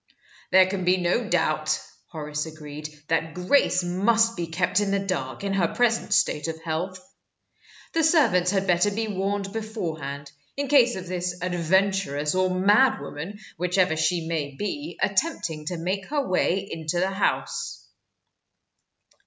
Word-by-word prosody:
"There 190 0 +7
can 185 0 -3
be 180 +1 +3
no 185 +6 0
doubt," - - +1 0.3
Horace 150 -1 -4
agreed, 155 -1 -8 0.2
"that 160 -1 0
Grace 180 0 +2
must 225 +6 +2
be 170 -2 -3
kept 180 +4 +1
in 205 -1 0
the 200 - +2
dark, 185 -8 -3
in 200 -1 -1
her 185 -3 +2
present 235 -1 +1
state 150 - +2
of 160 0 -4
health. 180 +3 -3 0.9
The 325 - +2
servants 270 - +4
had 195 0 +1
better 180 +2 +3
be 220 +2 -2
warned 195 0 -2
beforehand, 160 -11 -5 0.3
in 280 -1 -2
case 255 -4 +5
of 185 - -6
this 180 0 -3
adventuress 180 -4 +1
or 185 0 +2
madwoman, 190 - +2 0.2
whichever 180 -1 +2
she 165 +1 0
may 150 -4 -3
be, 290 - -4
attempting 190 - -1
to 180 - -2
make 185 +3 -3
her 290 -2 -1
way 185 +1 +1
into 160 0 -3
the 190 +2 +1
house." 195 +1 -2
185 Hz, 145 wpm, -25 LUFS, 165-205 Hz, 0.9 s, There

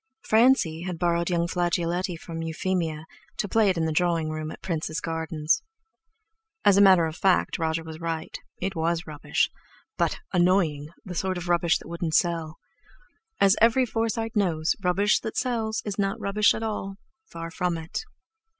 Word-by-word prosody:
Francie 220 -8 +3
had 180 -1 -4
borrowed 170 0 +1
young 170 -1 +1
Flageoletti 175 0 -1
from 165 -1 -6
Euphemia, 165 -1 -2 0.3
to 205 - -1
play 215 0 +3
it 185 - 0
in 165 - +1
the 160 - 0
drawing 165 -1 +1
room 155 0 -4
at - - -10
Prince's 160 -2 -2
Gardens. 160 - -1 1.0
As 200 - +7
a 200 - +6
matter 190 -4 +7
of 160 -1 -4
fact 190 -1 +2
Roger 160 0 -1
was 160 -1 -9
right. 165 -1 -4 0.2
It 190 +1 -3
was 165 +1 0
rubbish, 150 -2 -1 0.5
but—annoying! 175 -5 +1 0.2
the 185 - -6
sort 185 +1 -1
of 175 0 -6
rubbish 170 -1 +3
that - - -13
wouldn't 170 -1 -2
sell. 165 -3 0 0.8
As 195 +1 +5
every 235 +3 +5
Forsyte 225 0 -2
knows, 170 -6 +1
rubbish 195 +4 +3
that 220 - -6
sells 225 -3 -1
is 205 -1 -4
not 195 -1 0
rubbish 205 +1 +3
at 225 - -4
all—far 195 -3 -7
from 180 -2 -1
it. 160 +1 -5
175 Hz, 160 wpm, -26 LUFS, 165-195 Hz, 1.0 s, As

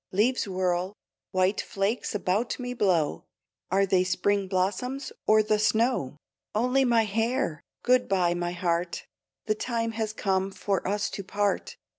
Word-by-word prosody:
Leaves 225 +4 +2
whirl, 185 0 -1 0.3
white 185 +1 +1
flakes 200 +3 -2
about 205 +4 0
me 245 -1 -4
blow 175 - +1 0.4
Are 195 +2 +3
they 185 -1 +3
spring 190 +2 +1
blossoms 205 +9 -1 0.2
or 215 0 +6
the 215 0 +1
snow? 215 - +1 0.4
Only 250 +5 +3
my 235 -3 +4
hair! 225 - -1 0.2
Good 250 0 +3
bye, 180 -3 +2
my 175 0 -2
heart, 175 -1 -1 0.4
The 215 - +2
time 230 +1 -2
has 220 -1 -2
come 190 -2 0
for 195 0 -2
us 205 +1 0
to 200 - -5
part. 205 +1 -1
200 Hz, 145 wpm, -27 LUFS, 185-225 Hz, 0.4 s, or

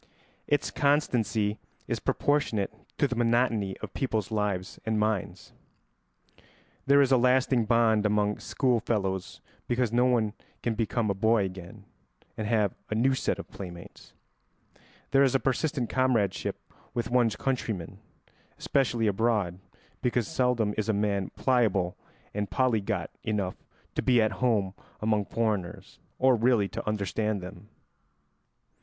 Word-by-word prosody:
Its 145 - +1
constancy 115 -7 +1 0.3
is - - -1
proportionate 145 -9 0 0.2
to 145 - +3
the 125 - -3
monotony 115 -4 +1
of 100 - -6
people's 110 -6 -2
lives 100 -4 -2
and 110 -1 0
minds. 105 -3 -2 1.3
There 140 +1 +6
is 135 - 0
a 130 - +6
lasting 125 -1 +3
bond 115 -2 +3
among 105 0 +1
schoolfellows 110 -7 -1 0.3
because 120 -2 +1
no 120 +1 +4
one 115 -4 +2 0.3
can 120 - 0
become 110 -1 0
a - - +1
boy 110 +1 +2
again 90 -2 -9 0.5
and 110 - -3
have 105 -3 +2 0.2
a 110 - -1
new 130 +4 +3
set 130 - -1
of - - -9
playmates. 85 -3 -10 1.0
There 135 - +5
is 135 -1 +4
a - - +4
persistent 135 -1 0
comradeship 115 -8 +1 0.4
with 120 0 -2
one's 120 -4 +3
countrymen, 110 -10 -3 0.6
especially 120 -4 +1
abroad, 105 -4 +1 0.4
because 120 -2 0
seldom 120 -5 +1
is 110 - -1
a - - +3
man 100 -2 0
pliable 105 -9 +1 0.4
and 105 0 -2
polyglot 110 - 0
enough 100 -4 -2 0.3
to - - -1
be 125 -2 +4
at 110 -1 +3
home 105 -7 +2 0.3
among 105 -1 +1
foreigners, 105 -6 -3 0.2
or 130 -1 +4
really 115 -3 +3
to - - -6
understand 105 0 -1
them. 95 +3 -10
110 Hz, 135 wpm, -28 LUFS, 105-125 Hz, 1.3 s, There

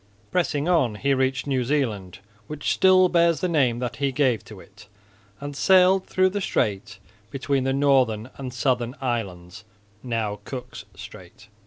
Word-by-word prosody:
Pressing 160 -4 0
on 135 -11 +2
he 140 +6 0
reached 130 0 0
New 135 -3 0
Zealand, 115 -9 -2 0.3
which 150 -1 -2
still 185 -1 +5
bears 170 -2 +2
the 185 - -1
name 135 -8 +1
that 120 -1 -4
he 140 -1 0
gave 130 -4 +1
to 105 -3 -12
it, 105 +2 -17 0.5
and 145 +1 -7
sailed 185 +3 +4
through 185 0 +2
the 200 +2 -4
strait 100 - -2 0.3
between 135 0 -1
the 135 - +1
northern 130 -5 +1
and 130 -2 -6
southern 125 -1 -1
islands, 105 -6 -4 0.4
now 110 -4 -3
Cook's 125 -3 -8
strait. 95 +2 -13
130 Hz, 155 wpm, -24 LUFS, 110-145 Hz, 0.5 s, still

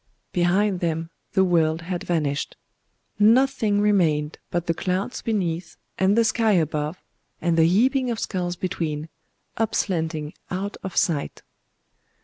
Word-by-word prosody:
Behind 185 +2 +2
them 165 -1 -2 0.2
the 190 - +4
world 165 -2 +2
had 180 0 -3
vanished. 150 -6 -1 0.6
Nothing 225 -1 +4
remained 165 -8 +2
but 175 -1 -1
the 165 - +1
clouds 185 +8 -2
beneath, 180 -7 -2 0.2
and 190 +3 +3
the 230 - +5
sky 220 -1 +2
above, 155 -1 0 0.4
and 170 -1 +1
the 165 0 +5
heaping 255 +8 +3
of 230 -2 -2
skulls 180 -4 -2
between,—up 165 +5 -4
slanting 160 -4 -1 0.2
out 195 +3 -3
of 190 - -6
sight. 160 -7 0
180 Hz, 130 wpm, -24 LUFS, 165-205 Hz, 0.6 s, the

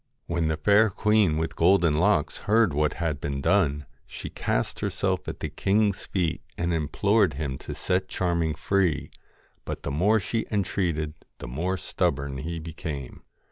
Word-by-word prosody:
When 85 -1 0
the 80 -1 0
Fair 105 +7 +5
Queen 105 -5 +2
with 80 +1 -2
Golden 85 -3 +4
Locks 95 -4 +2
heard 110 -6 +4
what 75 +1 +1
had 80 -5 -2
been 70 -1 -2
done, 75 -3 +2 0.2
she - - -7
cast - - -1
herself - - -1
at - - -6
the - - -2
king's 100 0 +1
feet 90 -5 -1 0.2
and 85 0 0
implored 90 +3 +2
him 70 -3 -3
to - - -7
set 95 0 0
Charming 85 -4 0
free, 95 -5 0 0.5
but - - -6
the - - -3
more 100 +10 +3
she 110 +3 -2
entreated 85 -7 -1 0.2
the - - -8
more 85 +10 -2
stubborn 70 -4 -1
he 85 +4 -4
became. 80 -4 -6
85 Hz, 160 wpm, -26 LUFS, 75-100 Hz, 0.5 s, Fair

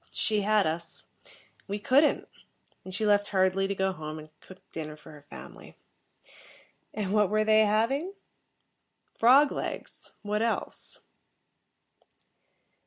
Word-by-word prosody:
She 215 -2 +1
had 210 0 +3
us. 165 +2 -3 0.6
We 200 +1 -2
couldn't, 270 +8 +3 0.6
and 185 - -9
she 205 +4 -2
left 205 -1 +3
hurriedly 190 0 +2
to 200 - -2
go 190 0 +1
home 155 -3 -7
and 155 0 -10
cook 190 - -14
dinner 155 -1 -6
for 155 - -15
her 150 -1 -13
family. - - -12 1.1
And 205 -2 -3
what 210 -3 +3
were 215 0 +2
they 215 0 +5
having? 270 - 0 1.1
Frog 270 +5 +6
legs - - -5
what 210 +1 -1
else? 230 0 -1
205 Hz, 125 wpm, -28 LUFS, 185-220 Hz, 1.1 s, Frog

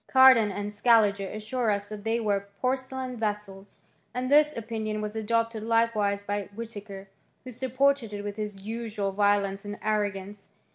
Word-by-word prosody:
Cardan 260 -5 +7
and 205 +1 -4
Scaliger 205 -3 +3
assure 215 +4 -2
us 205 -1 0
that 210 0 -8
they 225 +2 0
were 200 -3 0
porcelain 260 0 -2
vessels; 205 -3 -4 0.4
and 255 +1 -2
this 300 -1 +5
opinion 220 -1 -3
was 210 0 -4
adopted 230 0 0
likewise 220 -3 +1
by 205 -1 -3
Whitaker, 205 -3 -7 0.4
who 255 - -8
supported 260 0 +1
it 205 0 -5
with 205 -1 -4
his 210 -2 -5
usual 220 -3 -3
violence 200 -1 +1
and 205 0 -6
arrogance. 205 -2 -2
215 Hz, 150 wpm, -27 LUFS, 205-230 Hz, 0.4 s, Cardan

